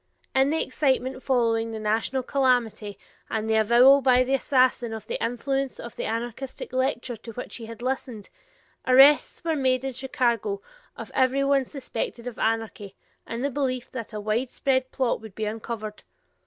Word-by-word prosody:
In 265 0 +3
the 320 +2 +1
excitement 260 -1 0
following 230 -4 +1
the 220 - -4
national 225 +5 0
calamity 240 -7 0 0.3
and 220 0 -2
the 220 - +2
avowal 240 +6 +6
by 255 -1 +5
the 260 +2 -1
assassin 255 -3 +2
of 220 -2 -7
the - - -4
influence 270 +3 -2
of 235 - -8
the - - -4
anarchistic 240 +4 -5
lecture 260 -2 -1
to 230 +1 -10
which 245 - -6
he 230 -2 -9
had 230 +1 -9
listened, 255 -5 -4 0.6
arrests 270 +6 +6
were 325 -1 0
made 260 -2 +1
in 270 -1 -3
Chicago 260 - -1 0.4
of - - -8
every 265 +1 +2
one 275 -1 +2
suspected 245 -3 -5
of 245 -2 -6
anarchy, 220 -3 -2 0.3
in 230 +1 -4
the 280 - 0
belief 255 -2 -2
that 235 -4 -6
a 215 - -5
widespread 255 +4 0
plot 255 -4 0
would 220 -4 -11
be 220 - -2
uncovered. 215 0 -5
250 Hz, 170 wpm, -25 LUFS, 225-265 Hz, 0.6 s, avowal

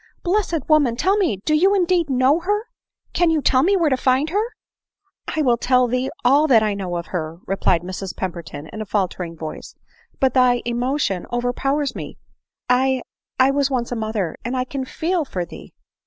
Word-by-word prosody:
" - - -42
Blessed 350 -5 0
woman! 290 -7 +3
tell 380 +10 +2
me 370 - +1
— - - -30
Do 305 - +2
you 380 +6 +4
indeed 350 -4 +2
know 265 +4 +3
her? 415 +5 -1 0.5
—can 350 -1 +3
you 320 -1 +2
tell 260 -2 +3
me 390 +7 +3
where 325 -5 +2
to - - +4
find 260 +4 +1
her 410 +4 +1 0.3
?" - - -68
" 390 - -49
I 310 - +2
will 245 -3 +3
tell 250 +1 +3
thee 255 +2 -1 0.2
all 285 +5 +5
that 230 -6 +5
I 210 -1 +1
know 185 -3 -3
of 170 - -5
her," 160 -2 -3
replied 185 -3 +1
Mrs 185 +1 -6
Pemberton 170 -5 -5
in 220 - -5
a - - -4
faltering 180 -4 -2
voice; 155 -1 -8 0.2
" 475 0 -34
but 265 -2 +2
thy 250 -2 +3
emotion 240 -5 -1
over 245 0 -1
powers 275 +1 -1
me. - - -7 0.3
— - - -70
I 260 0 +2 0.2
— - - -71
I 260 +1 +5
was 280 0 +1
once 250 -3 -2
a - - -1
mother, 215 -6 -2
and 245 +2 -2
I 255 - +1
can 265 +1 -5
feel 335 +5 -1
for 185 -10 -4
thee." - - -12
255 Hz, 220 wpm, -21 LUFS, 215-310 Hz, 0.5 s, all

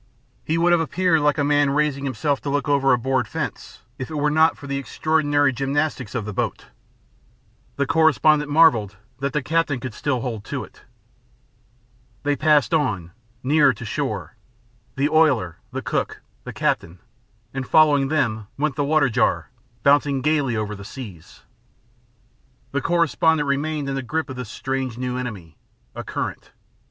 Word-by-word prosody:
He 160 - -1
would 175 +1 +3
have 175 -1 +4
appeared 180 0 +2
like 145 -1 +2
a 145 - +1
man 145 0 +3
raising 140 -1 0
himself 140 +1 -1
to 145 - -4
look 145 +2 -1
over 140 -1 +3
a 125 - +5
board 130 +2 0
fence, - - -6 0.2
if 130 - -5
it 155 - -6
were 150 0 +1
not 160 +2 +4
for 145 - -11
the 140 0 -2
extraordinary 145 0 +1
gymnastics 135 -2 -2
of 115 -4 -2
the 105 - -5
boat. - - -3 1.1
The 140 - 0
correspondent 155 -1 +3
marvelled 140 -10 +4 0.2
that 140 +1 -1
the 150 -1 -1
captain 160 -3 0
could 125 -1 -6
still 130 -1 -1
hold 115 -5 -4
to - - -4
it. - - -15 1.4
They 145 0 +1
passed 150 -4 +3
on, 100 - 0 0.3
nearer 145 +2 +4
to - - -9
shore - - -3 0.6
the 140 +2 +1
oiler, 145 - +2
the - - -4
cook, - - -2 0.2
the - - -5
captain 85 +2 -1 0.6
and 135 -1 -4
following 145 -3 +5
them 115 -8 0
went 150 0 0
the 145 - +1
water 150 -1 +3
jar, 115 - 0 0.3
bouncing 140 -1 +3
gaily 145 -5 +1
over 105 -1 -2
the 100 - -10
seas. 100 - -10 1.3
The 140 - -1
correspondent 160 -2 +2
remained 145 +1 -1
in 135 - -2
the 135 - -2
grip 155 +3 -3
of - - -6
this 125 -3 -6
strange 130 -2 -3
new 125 0 -3
enemy 105 - -6 0.4
a - - -6
current. - - -5
140 Hz, 165 wpm, -22 LUFS, 125-155 Hz, 1.4 s, a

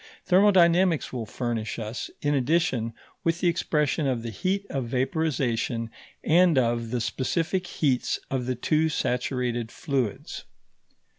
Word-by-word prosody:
Thermodynamics 180 -4 +4
will 115 -4 -4
furnish 115 -2 -3
us, 110 +1 -5
in 145 0 +2
addition, 135 -4 +1 0.3
with 165 0 +1
the 180 - +1
expression 155 -3 +1
of 125 -3 -1
the 115 - -4
heat 190 - -1
of 135 -3 -2
vaporization 125 -4 -1 0.3
and 170 -1 +4
of, 120 -2 +1
the 125 +1 -1
specific 165 - -1
heats 135 -8 0
of 130 -2 -1
the 130 - 0
two 155 +6 +1
saturated 125 -4 -1
fluids. 130 -8 -3
130 Hz, 130 wpm, -26 LUFS, 120-165 Hz, 0.3 s, Thermodynamics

